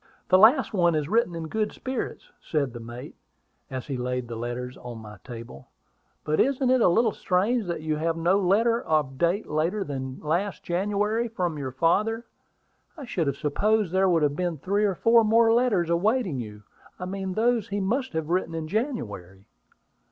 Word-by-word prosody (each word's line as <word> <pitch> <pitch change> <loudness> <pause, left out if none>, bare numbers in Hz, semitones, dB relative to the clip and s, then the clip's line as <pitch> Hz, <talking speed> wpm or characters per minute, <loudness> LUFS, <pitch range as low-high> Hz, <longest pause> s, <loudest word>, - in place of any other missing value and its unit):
"The 185 - +6
last 245 +5 +5
one 175 -4 +3
is 150 -2 -1
written 210 -2 +1
in 165 -1 -5
good 215 +5 -1
spirits," 260 -2 -5
said 140 -6 -1
the 120 - -7
mate, 120 +2 -9 0.6
as 130 -1 -5
he 135 -3 -4
laid 125 0 -3
the 115 - -6
letters 120 +2 -5
on 120 -1 -8
my 105 -2 -10
table. 115 - -10 0.6
"But 155 +1 0
isn't 265 -1 +2
it 255 -1 +4
a - - +6
little 220 +6 +3
strange 205 +6 0
that 170 -2 -3
you 155 -1 -1
have 165 +1 -1
no 175 +4 +2
letter 225 +5 +2
of 150 -3 -1
later 175 +1 0
date - - -12
than 130 -2 -5
last 175 +6 -2
January 210 +5 0
from 180 -8 -3
your 135 -2 -4
father? 210 - +1 0.7
I 285 - -7
should 175 -10 -1
have 140 0 -1
supposed 205 +7 +1
there 190 +1 +3
would 165 -3 +3
have 145 -1 +1
been 175 -1 -2
three 200 +8 0
or 195 -2 0
four 230 +4 +5
more 225 +1 +4
letters 215 -9 +2
awaiting 190 - +1
you; 105 -3 -8 0.3
I 180 - -5
mean 190 0 -4
those 230 0 +1
he 200 +1 -2
must 240 +6 -1
have 160 -1 -3
written 175 -2 0
in 160 -1 -4
January." 105 - -4
175 Hz, 190 wpm, -26 LUFS, 145-215 Hz, 0.7 s, The